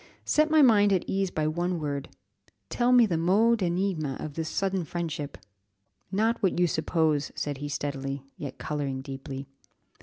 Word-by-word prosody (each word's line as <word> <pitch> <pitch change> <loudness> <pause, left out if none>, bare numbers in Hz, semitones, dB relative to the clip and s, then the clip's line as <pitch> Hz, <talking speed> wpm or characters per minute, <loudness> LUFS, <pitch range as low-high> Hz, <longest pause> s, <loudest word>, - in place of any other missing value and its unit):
set 305 +1 +3
my 310 -1 +6
mind 205 -5 +5
at 185 -3 +2
ease 195 -1 0
by 155 -3 -1
one 175 +3 -1
word, 145 -2 -3 0.6
tell 245 0 +2
me 245 -2 +7
the 170 -6 0
mot 215 +7 +3
d'énigme 175 -6 -1
of 150 - -5
this 160 +1 -3
sudden 195 -2 -1
friendship." 155 - -4 0.7
"Not 225 +4 +1
what 190 -4 +1
you 180 - +5
suppose," 160 -3 +1
said 145 -2 -3
he 145 0 -4
steadily, 140 -1 -3
yet 140 -3 -7
colouring 140 -3 -3
deeply. 135 0 -6
165 Hz, 160 wpm, -27 LUFS, 145-195 Hz, 0.7 s, me